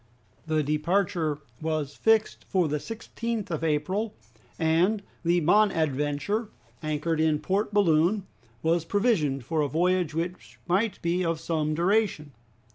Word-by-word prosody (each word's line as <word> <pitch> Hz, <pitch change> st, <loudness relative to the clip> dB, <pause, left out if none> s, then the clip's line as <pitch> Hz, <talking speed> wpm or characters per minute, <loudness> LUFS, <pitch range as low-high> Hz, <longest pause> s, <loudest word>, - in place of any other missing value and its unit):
The 155 Hz, -1 st, +1 dB
departure 155 Hz, +1 st, 0 dB, 0.2 s
was 155 Hz, -3 st, -2 dB
fixed 225 Hz, -1 st, +2 dB
for 185 Hz, -4 st, +2 dB
the 150 Hz, 0 st, -1 dB
16th 225 Hz, 0 st, -5 dB
of 160 Hz, -1 st, -2 dB
April, 185 Hz, +8 st, 0 dB, 0.4 s
and 175 Hz, +6 st, +2 dB, 0.2 s
the 175 Hz, +1 st, +3 dB
"Bonadventure," 160 Hz, -, +1 dB, 0.3 s
anchored 155 Hz, +1 st, -1 dB
in 155 Hz, -1 st, +3 dB
Port 200 Hz, +6 st, -1 dB
Balloon, 190 Hz, 0 st, +3 dB, 0.4 s
was 165 Hz, +1 st, +2 dB
provisioned 165 Hz, -, +1 dB
for 160 Hz, +2 st, 0 dB
a 145 Hz, -, +1 dB
voyage 175 Hz, 0 st, +1 dB
which 175 Hz, +2 st, -4 dB
might 195 Hz, +5 st, +1 dB
be 175 Hz, +2 st, +1 dB
of 165 Hz, -2 st, -1 dB
some 155 Hz, -2 st, -1 dB
duration. 180 Hz, -4 st, +1 dB
170 Hz, 125 wpm, -27 LUFS, 155-200 Hz, 0.4 s, the